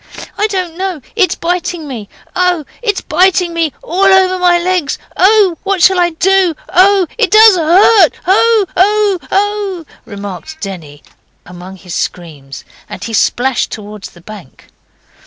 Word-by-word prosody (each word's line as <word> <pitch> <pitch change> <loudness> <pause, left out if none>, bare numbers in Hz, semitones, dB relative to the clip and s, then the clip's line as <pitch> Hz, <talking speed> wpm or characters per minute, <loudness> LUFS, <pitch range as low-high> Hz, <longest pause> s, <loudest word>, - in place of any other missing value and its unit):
'I 415 +2 0
don't 365 -5 -4
know, 375 -3 -3 0.2
it's 390 -5 +1
biting 345 -2 -3
me. 230 -7 -8 0.3
Oh, 360 -4 0 0.2
it's 420 -5 -2
biting 360 +1 +1
me 330 -2 -1
all 370 +3 -2
over 380 -1 +3
my 355 -1 +3
legs! 345 -4 -1 0.2
Oh, 390 -3 +3
what 390 -3 -1
shall 380 -1 +4
I 350 -1 +2
do? 365 +1 +1
Oh, 385 +1 +3
it 440 -5 +2
does 435 +1 +7
hurt! 355 +2 +4
Oh! 440 +3 +3
oh! 405 0 +2
oh!' 400 -3 -2 0.2
remarked 200 - -9
Denny, 160 -7 -9 0.4
among 180 +2 -11
his 180 -2 -11
screams, 145 -6 -6 0.3
and 190 - -8
he 230 - -6
splashed 245 +3 0
towards 210 -1 -9
the 175 - -19
bank. 185 -7 -14
355 Hz, 145 wpm, -13 LUFS, 230-385 Hz, 0.4 s, does